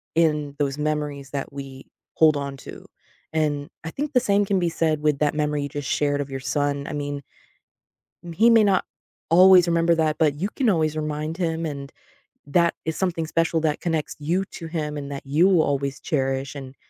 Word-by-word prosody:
in 150 -3 +1
those 140 -1 0
memories 150 -2 -3
that 140 -1 -4
we 135 -1 -9 0.3
hold 155 -2 +5
on 140 -1 -4
to, - - -10 0.5
and 145 -2 -1
I 165 - -4
think 295 - -4
the 250 - +4
same 205 -3 +2
can 195 -1 +1
be 175 -1 +1
said 160 -2 0
with 150 -2 +1
that 150 0 +1
memory 150 -1 0
you 145 - -4
just 145 -1 -5
shared 145 -1 +1
of 140 - -5
your 135 - -4
son 145 0 -1
I - - -5
mean 145 -1 -4 1.1
he 225 +7 +5
may 225 -2 +6
not 195 -3 +2 0.4
always 180 +1 +7
remember 170 0 +3
that, 155 -1 +1
but 150 -3 +2
you 190 +7 -2
can 250 -5 +2
always 155 -4 +1
remind 155 +1 -3
him, 165 -2 -1
and 140 -3 -6 0.5
that 170 +3 +2
is 160 - -2
something 170 -4 -1
special 165 0 +1
that 155 -2 0
connects 165 -3 -2
you 175 +6 0
to 165 - -9
him 150 -2 -3
and 140 0 -6
that 140 - -6
you 150 +7 +3
will 180 -5 +4
always 140 -1 -1
cherish, 135 -1 -2
and, 135 -1 -8
150 Hz, 200 wpm, -23 LUFS, 145-165 Hz, 1.1 s, always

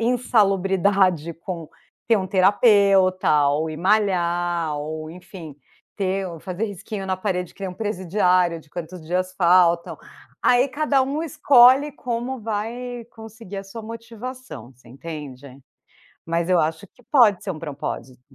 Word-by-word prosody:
insalubridade 195 -7 +2
com 170 -1 -7 0.4
ter 230 - +5
uma 190 -2 -2
terapeuta 190 - +4
ou 155 +3 -1
ir 155 - -6
malhar, 175 -4 +1
ou 155 +1 -5
enfim, 175 -3 -11 0.4
ter 195 -1 -1
o 170 -2 -8
fazer 185 +5 -4
risquinho 200 0 -7
na 185 - -1
parede 180 -2 -3
que - - -24
nem 190 - -3
um 180 - -10
presidiário, 180 -4 +1
de 150 - -23
quantos 175 +2 -7
dias 185 +2 -1
faltam, 175 -1 +3 0.5
aí 250 +1 +4
cada 285 0 +1
um 280 +4 -2
escolhe 275 -2 +5
como 245 0 -4
vai 230 +3 -4
conseguir 220 -3 -11
a 195 - -7
sua 220 +4 -9
motivação, 230 - -9
você 125 -1 -21
entende. 140 -1 -9 0.7
Mas 170 +1 -1
eu 180 -2 +4
acho 160 +5 -2
que 245 - -25
pode 220 -8 +5
ser 205 - -4
um 165 - -5
propósito. 140 -4 -6
190 Hz, 145 wpm, -22 LUFS, 170-225 Hz, 0.7 s, ter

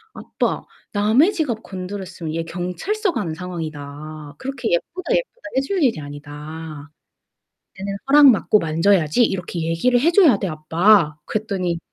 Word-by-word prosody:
"아빠, - - -2 0.3
남의 220 - +4
지갑 265 - -2
건드렸으면 185 -3 -6
얘 165 - -1
경찰서 180 - -2
가는 170 - -2
상황이다. 155 -3 -7
그렇게 265 -4 -3
예쁘다 335 - -1
예쁘다 - - -3 0.2
해줄 315 +7 0
일이 240 - +2
아니다." 145 +1 -9 0.9
"얘는 195 +1 -4
'허락 285 +1 +8
맡고 210 -1 +3
만져야지.' 165 +4 +2
이렇게 180 -5 -2
얘기를 165 +10 +2
해 330 +5 +4
줘야 335 - +6
돼, 195 - -2
아빠." 160 +1 +3
그랬더니 190 -6 -2
180 Hz, 315 characters per minute, -21 LUFS, 155-245 Hz, 0.9 s, 허락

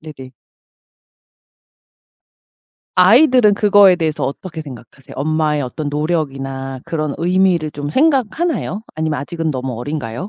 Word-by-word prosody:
네네. 135 -5 -11 2.6
아이들은 225 +3 +5
그거에 200 -3 +5
대해서 160 -3 -2
어떻게 160 +4 -6
생각하세요? 130 -2 -12
엄마의 150 0 0
어떤 145 +4 -5
노력이나 135 -4 -3
그런 155 -3 -3
의미를 175 -2 +1
좀 145 0 -6
생각하나요? 270 - 0
아니면 155 -2 -2
아직은 165 +2 -3
너무 130 -2 -4
어린가요? 145 - -5
155 Hz, 305 characters per minute, -17 LUFS, 140-185 Hz, 2.6 s, 아이들은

